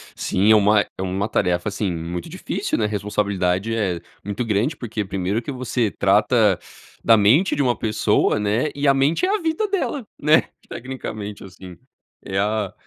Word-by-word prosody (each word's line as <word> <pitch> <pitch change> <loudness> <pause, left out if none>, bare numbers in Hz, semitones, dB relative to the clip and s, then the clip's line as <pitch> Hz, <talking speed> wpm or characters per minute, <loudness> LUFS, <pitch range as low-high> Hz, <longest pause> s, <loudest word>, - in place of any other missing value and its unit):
Sim, 100 +4 +2
é - - +8
uma 105 0 +4
é - - -8
uma 95 +3 -2
tarefa, 90 +3 0
assim, 100 -1 -2
muito 85 +1 -5
difícil, - - -3
né. 110 - +1
A - - +1
responsabilidade 100 -1 -1
é 95 -6 -1 0.2
muito 105 +4 -3
grande, 110 +8 0
porque 110 -5 -4
primeiro 95 +3 -2
que 120 - -6
você 125 -4 -1
trata 105 0 +3 0.4
da 115 - +6
mente 125 - +4
de - - 0
uma 125 -3 +1
pessoa, 110 -1 +1
né. 105 +8 0
E 145 0 0
a 140 - +6
mente 140 - +2
é - - 0
a - - -2
vida 325 +6 0
dela, 355 - -2 0.2
né. 155 +2 +4 0.2
Tecnicamente, 110 -5 -6
assim, 95 -1 -12 0.5
é 95 - -3
a 105 -1 -1
105 Hz, 175 wpm, -22 LUFS, 100-125 Hz, 0.5 s, é